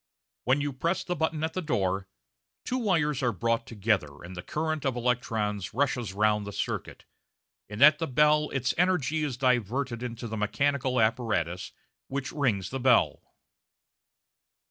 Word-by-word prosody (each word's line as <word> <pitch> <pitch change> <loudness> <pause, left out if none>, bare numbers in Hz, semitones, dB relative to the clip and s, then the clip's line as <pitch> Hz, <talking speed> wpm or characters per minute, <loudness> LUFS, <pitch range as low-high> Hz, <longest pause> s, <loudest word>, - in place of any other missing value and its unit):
When 130 +3 +3
you 145 -1 -2
press 165 +8 -1
the 180 - -2
button 160 -1 -1
at 160 - -1
the 185 - -2
door, 95 - -1 0.6
two 255 - -1
wires 160 - +1
are 125 -2 +2
brought 115 +3 -1
together, 100 -10 -1
and 90 +2 -9
the 90 - -5
current 155 - -2
of 135 -3 0
electrons 115 -5 -1
rushes 125 -5 0
round 105 +1 +1
the - - -5
circuit; - - -4 0.6
and 105 +5 +1
at 150 +1 +8
the 165 - -1
bell 150 +3 +3
its 130 -1 0
energy 160 -4 +2
is 135 -5 -2
diverted 125 0 0
into 120 -1 -5
the 110 0 -4
mechanical 130 +5 0
apparatus 105 -6 0 0.4
which 135 0 -4
rings 120 - 0
the 135 - -3
bell. 125 -1 +3
125 Hz, 155 wpm, -28 LUFS, 105-150 Hz, 0.6 s, at